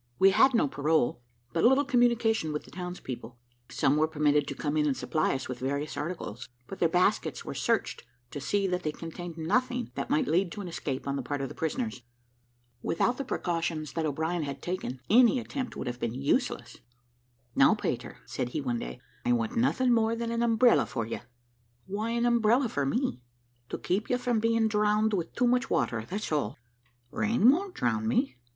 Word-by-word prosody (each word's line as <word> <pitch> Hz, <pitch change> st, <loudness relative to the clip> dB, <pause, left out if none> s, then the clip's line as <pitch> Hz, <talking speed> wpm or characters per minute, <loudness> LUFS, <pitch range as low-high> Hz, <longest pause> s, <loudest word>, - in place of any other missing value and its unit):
We 195 Hz, +1 st, +6 dB
had 265 Hz, +6 st, +5 dB
no 190 Hz, -, +3 dB
parole, 145 Hz, -1 st, +2 dB
and 120 Hz, 0 st, -19 dB
but 165 Hz, -, +1 dB
little 265 Hz, +4 st, +5 dB
communication 235 Hz, -, +2 dB
with 150 Hz, -, -3 dB
the -, -, -15 dB
townspeople. 155 Hz, -10 st, -7 dB, 0.3 s
Some 140 Hz, +2 st, +2 dB
were 155 Hz, +1 st, +3 dB
permitted 150 Hz, -2 st, +2 dB
to 140 Hz, -, -4 dB
come 145 Hz, +2 st, -2 dB
in 150 Hz, -1 st, +2 dB
and 135 Hz, -, 0 dB
supply 155 Hz, -3 st, 0 dB
us 135 Hz, -, -4 dB
with 125 Hz, -1 st, -5 dB
various 140 Hz, +3 st, -2 dB
articles; 145 Hz, -, -5 dB, 0.2 s
but 195 Hz, -, -9 dB
their 170 Hz, -, +3 dB
baskets 180 Hz, +5 st, +1 dB
were -, -, -4 dB
searched, -, -, -1 dB, 0.3 s
to 145 Hz, -, -6 dB
see 200 Hz, +8 st, 0 dB
that 180 Hz, -1 st, 0 dB
they 155 Hz, -, -1 dB
contained 165 Hz, +1 st, -7 dB
nothing 250 Hz, +9 st, 0 dB
that -, -, -4 dB
might 290 Hz, 0 st, +2 dB
lead 175 Hz, +1 st, +2 dB
to 205 Hz, -, -6 dB
an 190 Hz, -, -6 dB
escape 140 Hz, -6 st, -4 dB
on 140 Hz, 0 st, -1 dB
the -, -, -2 dB
part 145 Hz, +3 st, -3 dB
of 135 Hz, -1 st, -3 dB
the -, -, -8 dB
prisoners. 220 Hz, -, -3 dB, 0.8 s
Without 245 Hz, -, 0 dB
the -, -, -1 dB
precautions 165 Hz, -, -2 dB
that 160 Hz, -2 st, -1 dB
O'Brien 160 Hz, +4 st, -1 dB
had 140 Hz, -2 st, -4 dB
taken, 175 Hz, -8 st, -4 dB
any 245 Hz, +3 st, +6 dB
attempt 255 Hz, +1 st, -5 dB
would -, -, -5 dB
have 120 Hz, -1 st, -4 dB
been 120 Hz, 0 st, -2 dB
useless. 145 Hz, -, -1 dB, 0.8 s
"Now, -, -, +5 dB
Peter," -, -, -4 dB
said 125 Hz, -, -3 dB
he 155 Hz, -, -3 dB
one 125 Hz, -4 st, -1 dB
day, -, -, -6 dB, 0.2 s
"I 120 Hz, -, +2 dB
want 115 Hz, -2 st, -1 dB
nothing 250 Hz, +1 st, +3 dB
more 225 Hz, 0 st, +2 dB
than 230 Hz, 0 st, -3 dB
an 235 Hz, 0 st, -1 dB
umbrella 235 Hz, +1 st, +4 dB
for 115 Hz, -4 st, -3 dB
you." 115 Hz, -, -4 dB, 0.7 s
"Why 210 Hz, +4 st, -3 dB
an 235 Hz, +1 st, 0 dB
umbrella 235 Hz, +1 st, +3 dB
for 140 Hz, -7 st, -1 dB
me?" 240 Hz, -, -1 dB, 0.5 s
"To -, -, -3 dB
keep 195 Hz, +4 st, -1 dB
you 250 Hz, -, +2 dB
from 245 Hz, -2 st, 0 dB
being 230 Hz, 0 st, +2 dB
drowned 210 Hz, 0 st, +2 dB
with 175 Hz, -4 st, -2 dB
too 250 Hz, -, +2 dB
much 250 Hz, +2 st, +2 dB
water, 110 Hz, -2 st, 0 dB
that's 205 Hz, -1 st, -4 dB
all." 140 Hz, -6 st, -1 dB, 0.5 s
"Rain 225 Hz, +2 st, +4 dB
won't 370 Hz, +5 st, -2 dB
drown 220 Hz, 0 st, 0 dB
me." 245 Hz, -, +1 dB
180 Hz, 200 wpm, -29 LUFS, 140-235 Hz, 0.8 s, We